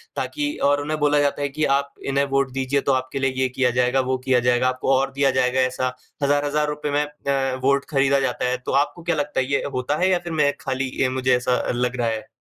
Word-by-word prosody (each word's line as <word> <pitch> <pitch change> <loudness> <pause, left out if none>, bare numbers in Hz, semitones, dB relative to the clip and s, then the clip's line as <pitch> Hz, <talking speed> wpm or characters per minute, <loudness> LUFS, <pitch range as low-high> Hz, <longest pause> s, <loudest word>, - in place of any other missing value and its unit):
ताकि 295 0 -2
और 145 0 +2
उन्हें 155 +1 -3
बोला 145 0 +3
जाता 145 0 0
है 140 - 0
कि, 155 +3 -3
"आप 140 +1 0
इन्हें 140 +1 +1
वोट 135 -1 +1
दीजिए 135 +1 0
तो - - +5
आपके 130 +1 -2
लिए 135 -1 +1
ये 130 - +3
किया 125 0 +1
जाएगा, 125 +2 +2
वो 130 0 0
किया 130 -2 +3
जाएगा।" 125 +1 +2
आपको 130 +1 0
और 135 +1 +1
दिया 135 0 +2
जाएगा 125 +1 +1
ऐसा। 130 0 -1 0.3
1000-1000 145 +1 +1
रुपए 150 0 -3
में 145 +1 +2
अ, 140 -3 -2
वोट 140 +1 +2
खरीदा 140 -1 +2
जाता 130 -1 -1
है। 125 - 0
तो - - -2
आपको 170 +3 -11
क्या 175 -1 0
लगता 145 -2 -1
है 130 - +1
ये 140 - +1
होता 130 +4 -1
है 190 - +4
या 180 - +2
फिर 165 - -3
मैं 150 -2 +3
खाली 130 0 -2
अ, - - -1
ये 130 - +3
मुझे 130 0 +1
ऐसा 125 0 0
लग 125 +1 -1
रहा 120 -2 0
है? 110 +3 -3
135 Hz, 250 wpm, -22 LUFS, 130-145 Hz, 0.3 s, तो